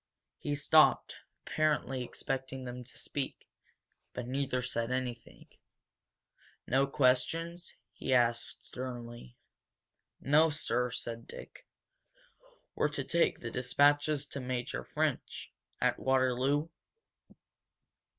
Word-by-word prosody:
He 145 - -2
stopped, 155 +2 +5 0.3
apparently 145 -4 0
expecting 130 +1 -4
them 125 0 -6
to 125 - -12
speak. 140 -2 -4 0.7
But 125 - -4
neither 130 0 -1
said 115 -2 -1
anything. 125 - -4 1.2
"No 135 +2 +3
questions?" 165 +6 +1 0.2
he - - -4
asked, 120 -2 +2
sternly. 120 - -7 0.8
"N$1 150 +3 +5
$2 - - -4
sir," 125 -4 0
said 115 -1 -5
Dick. - - -11 1.1
"We're - - +1
to 145 -2 -2
take 170 +5 +1
the 115 - -5
dispatches 145 +4 +3
to 140 - -5
Major 125 - -3
French, - - -2 0.3
at - - +2
Waterloo? 130 +3 +2
130 Hz, 100 wpm, -32 LUFS, 125-145 Hz, 1.2 s, stopped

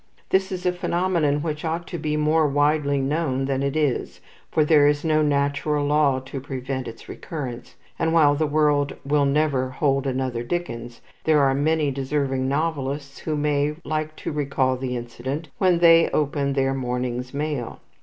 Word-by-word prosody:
This 190 +1 +2
is 185 -1 -5
a 180 - +3
phenomenon 170 -5 0
which 150 -2 -3
ought 165 +1 -2
to 175 - -5
be 150 -1 -1
more 155 +1 +3
widely 145 0 +2
known 135 -1 0
than 135 0 -1
it 140 +1 -1
is, 150 -5 -1 0.3
for 155 - +2
there 150 -2 +5
is 145 +1 +1
no 155 -1 +3
natural 145 0 +1
law 145 -2 +3
to 135 +1 -7
prevent 130 -1 -4
its 115 - -10
recurrence; 130 -7 -7 0.2
and 160 - +1
while 155 -3 +5
the 155 +2 0
world 145 -1 +2
will 145 0 +2
never 140 -2 +1
hold 135 +1 0
another 130 -2 -2
Dickens, 120 -5 -5 0.2
there 155 -2 +4
are 135 -1 +3
many 150 +1 +1
deserving 135 -1 -1
novelists 140 -1 -2
who 155 - -2
may 145 0 +1
like 155 +1 -3
to - - -5
recall 140 -3 0
the 125 -1 -3
incident 130 +6 -5
when 185 -2 +4
they 165 -1 +6
open 145 -1 0
their 135 -1 +1
morning's 125 -1 -3
mail. 145 -4 -3
145 Hz, 170 wpm, -23 LUFS, 135-155 Hz, 0.3 s, they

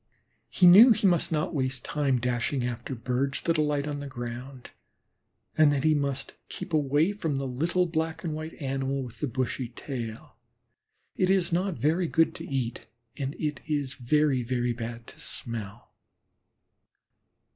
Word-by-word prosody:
He 185 - +3
knew 210 +8 +10
he 205 - -1
must 175 -4 +3
not 155 +2 0
waste 130 -3 -1
time 140 -4 +1
dashing 125 +2 -1
after 125 +2 -4
Birds 130 +3 -1
that 165 -2 +1
alight 150 -1 +1
on 145 -1 -3
the 145 - -6
ground; 125 +1 -7 0.8
and 155 -2 +6
that 140 -2 0
he 155 0 +4
must 140 -2 -2 0.2
keep 175 - -7
away 150 +4 +3
from 165 -8 -2
the 135 0 -2
little 165 +8 +1
black 160 0 -2
and 165 -3 -2
white 155 +1 -6
Animal 135 -1 -2
with 120 -2 -10
the 150 - -1
bushy 130 0 -2
tail. 115 -3 -7 0.8
It 185 - +1
is 190 -2 +2
not 185 +1 +1
very 165 +5 +1
good 165 +1 +3
to - - -7
eat, 130 -4 -3 0.3
and 140 +1 -4
it 150 -4 -3
is 145 -4 -1
very, 135 +1 +2
very 120 0 -1
bad 115 0 -6
to - - -13
smell. 115 -1 -6
140 Hz, 160 wpm, -28 LUFS, 125-160 Hz, 0.8 s, knew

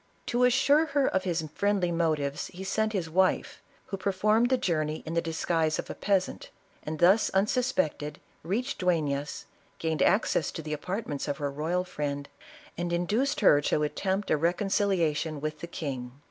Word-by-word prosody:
To 245 +1 +2
assure 280 +5 +4
her 280 - +4
of 190 0 0
his 165 -3 -1
friendly 200 -3 +1
motives, 155 -4 0
he 185 +2 -9
sent 220 +3 0
his 185 -6 -2
wife, 185 +3 +1 0.2
who 195 - -5
performed 210 +5 +2
the 260 - +3
journey 155 -7 -1
in 160 - -4
the 170 - +2
disguise 165 -1 0
of - - -5
a - - -4
peasant, 195 -2 -1 0.3
and, 155 +1 -5
thus 185 +7 +5
unsuspected, 190 - 0 0.2
reached 230 - -2
Duefias, 150 -6 -1 0.3
gained 160 -1 -1
access 190 -6 +2
to 160 - -6
tlio 155 0 -4
apartments 155 -1 -4
of 145 -1 -2
her 145 -1 -2
royal 160 +6 -1
friend, 145 -5 -4 0.5
and 175 0 -2
induced 210 +12 0
her 145 -8 +6
to 150 +1 +1
at 150 0 -2
tempt 195 +1 -1
a - - +4
reconciliation 170 -3 +1
with 155 +1 -4
the 170 - -6
king. 130 -7 -5
170 Hz, 170 wpm, -28 LUFS, 155-200 Hz, 0.5 s, her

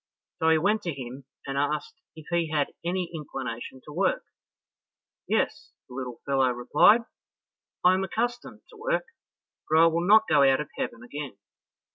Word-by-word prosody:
So 160 - +3
he 160 - +5
went 210 +7 +1
to 170 -6 -4
him, 130 +2 -8 0.2
and 140 0 -2
asked 150 +1 -1 0.2
if 160 -1 -12
he 170 -2 +1
had 150 -2 0
any 180 0 -2
inclination 130 -5 -6
to 150 - -10
work. 185 +4 +1 1.0
"Yes," - - -1
the - - -13
little 125 -2 -6
fellow 135 -2 +2
replied, 125 - +4 0.8
"I 180 - +7
am 190 +1 0
accustomed 240 +5 -3
to 455 - -15
work, - - -1 0.6
but 155 - +4
I 165 - +7
will 165 +1 +1
not 220 +2 +6
go 150 -3 +4
out 135 -1 +5
of 150 - -5
heaven 115 0 -4
again." 140 -3 -7
155 Hz, 165 wpm, -27 LUFS, 135-185 Hz, 1.0 s, I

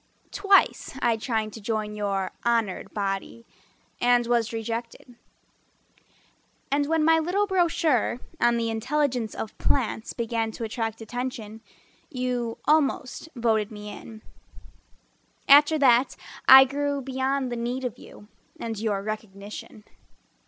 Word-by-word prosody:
Twice 395 -8 +2
I 235 -3 +2
tried 220 -2 -2
to 225 - -9
join 215 0 -2
your 200 -2 -2
honored 230 -5 0
body, 200 +3 -4 0.6
And 245 0 +4
was 235 -2 +1
rejected 230 +2 -5 1.6
And 285 0 +1
when 320 0 +2
my 325 0 +5
little 365 +6 +1
brochure 335 - +1 0.2
On 240 0 +3
the 230 -1 -1
intelligence 245 -1 -1
of 220 - -6
plants 235 -3 -1
Began 230 -1 -2
to 230 - -6
attract 225 0 -3
attention 225 -2 -5 0.5
You 250 -5 -2
almost 300 -1 +1
voted 220 -3 +1
me 210 -1 -8
in. 220 0 -11 1.2
After 295 +2 +7
that 255 -2 +4 0.3
I 265 0 +11
grew 285 +1 -2
beyond 265 0 -1
the - - -2
need 245 +2 -3
of 245 -1 -5
you 205 - -14 0.3
And 225 -2 -4
your 205 -3 -1
recognition. 210 0 -7
235 Hz, 125 wpm, -25 LUFS, 220-270 Hz, 1.6 s, I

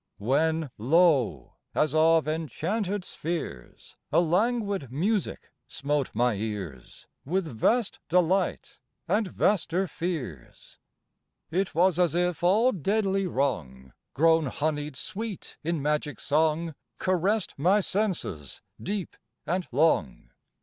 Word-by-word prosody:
When 155 +6 +1
lo! 145 0 +2 0.2
as 155 -2 +2
of 160 0 +4
enchanted 180 +6 -2
spheres 155 - -6
A - - +5
languid 200 - +1
music 195 - -1 0.2
smote 140 +1 -1
my 120 +1 +3
ears, 100 - -6 0.2
With 185 +6 -1
vast 190 - 0
delight, 180 +3 +1 0.3
and 215 -1 +1
vaster 190 -1 +1
fears. 145 - -6 0.7
It 185 0 -1
was 180 +1 +3
as 175 -2 +2
if 180 -2 0
all 215 +8 +4
deadly 195 - 0
wrong 75 - -2 0.2
Grown 160 0 +4
honied 150 +1 -2
sweet 215 - -6
in 165 -2 -1
magic 150 0 -1
song 160 +2 +1 0.2
Caressed 185 +2 0
my 185 +8 +4
senses, 185 - -2 0.2
deep 200 -1 -3 0.3
and 180 +2 -1
long. 140 - +1
165 Hz, 110 wpm, -27 LUFS, 140-190 Hz, 0.7 s, A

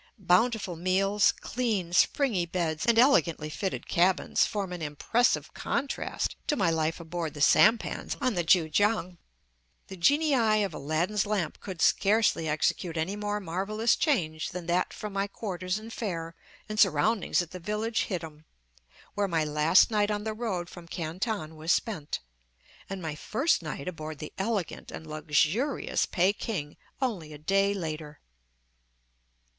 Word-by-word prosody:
Bountiful 195 0 +2
meals, 195 +4 +3
clean, 210 -9 -2
springy 195 -3 +2
beds, 165 -1 -2
and 235 -1 +4
elegantly 170 - +3
fitted 190 +3 -3
cabins, 180 +2 +2
form 195 -4 -3
an 175 - -6
impressive 160 +11 0
contrast 280 0 -2
to 295 - +2
my 190 -10 +2
life 160 0 0
aboard 165 -2 -4
the - - -7
sampans 220 +9 +3
on 255 - +1
the 175 -3 0
Kan 165 -1 +4
kiang. 205 -1 +1 0.7
The 190 - -8
genii 235 - +3
of 195 -4 -3
Aladdin's 170 +9 -1
lamp 200 -7 -1
could 185 -4 -4
scarcely 200 -5 +3
execute 160 +2 0
any 170 +5 -1
more 210 0 -2
marvellous 205 +5 0
change 160 - 0
than 180 -1 -6
that 175 +2 +1
from 210 -2 -7
my 195 0 0
quarters 185 -2 -3
and 220 +1 -9
fare 165 -8 -4 0.3
and 215 0 -4
surroundings 215 -6 +3
at 170 - -12
the 185 - -7
village 210 +5 -1
hittim, 160 -5 -5 0.7
where 205 -1 0
my 165 -4 +1
last 150 +7 +4
night 210 -1 +2
on 210 0 -2
the 220 0 -2
road 210 -6 -3
from 175 -1 -12
Canton 165 0 -3
was 160 +2 -1
spent, 170 -11 -1 0.7
and 190 -2 -5
my 160 -2 -3
first 255 - 0
night 150 -2 -6
aboard 155 -3 -5
the 155 - -8
elegant 200 -3 -2
and 160 - -8
luxurious 155 - 0
Peking, 185 -4 -1 0.3
only 180 -12 -3
a - - -8
day 195 +6 +2
later. 155 -4 -5
185 Hz, 150 wpm, -28 LUFS, 160-215 Hz, 0.7 s, and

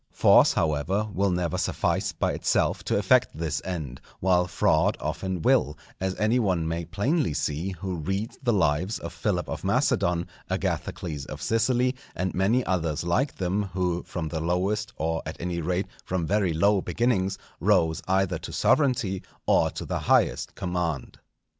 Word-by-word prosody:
Force, - - +5
however, 80 +7 0
will 100 +2 +1
never 90 -3 -1
suffice - - 0
by - - -1
itself - - +1
to - - +1
effect - - +3
this 80 -2 -2
end, 75 -9 -5 0.2
while 90 -1 +3
fraud 90 +4 +2
often 90 +3 -3
will, 120 - +3 0.2
as 95 0 -1
any 110 +4 +2
one 90 -7 +1
may 85 +1 -2
plainly 115 - 0
see 85 +6 -2
who 90 0 -4
reads 95 - -3
the 125 -3 +2
lives 90 +1 +1
of 85 - -7
Philip 90 0 -1
of - - -5
Macedon, 85 0 +1 0.2
Agathocles 75 -5 -3
of - - -7
Sicily, 125 +3 +1 0.2
and 90 +1 -2
many 110 +7 +2
others 80 -5 -1
like 125 +12 0
them, 95 +2 0
who 90 -2 0
from 80 -3 -5
the 80 - -3
lowest 95 +6 0
or, 80 +1 -1
at - - -7
any 85 0 -2
rate, 90 +4 -1 0.2
from 90 -2 -2
very 100 0 +1
low 100 +5 +3
beginnings, 95 -1 0 0.2
rose 85 -3 +2
either 95 -2 +1
to - - -7
sovereignty 120 -10 +2 0.2
or - - +4
to - - -6
the - - -2
highest - - +2
command. 90 -7 -3
90 Hz, 160 wpm, -26 LUFS, 85-100 Hz, 0.2 s, Force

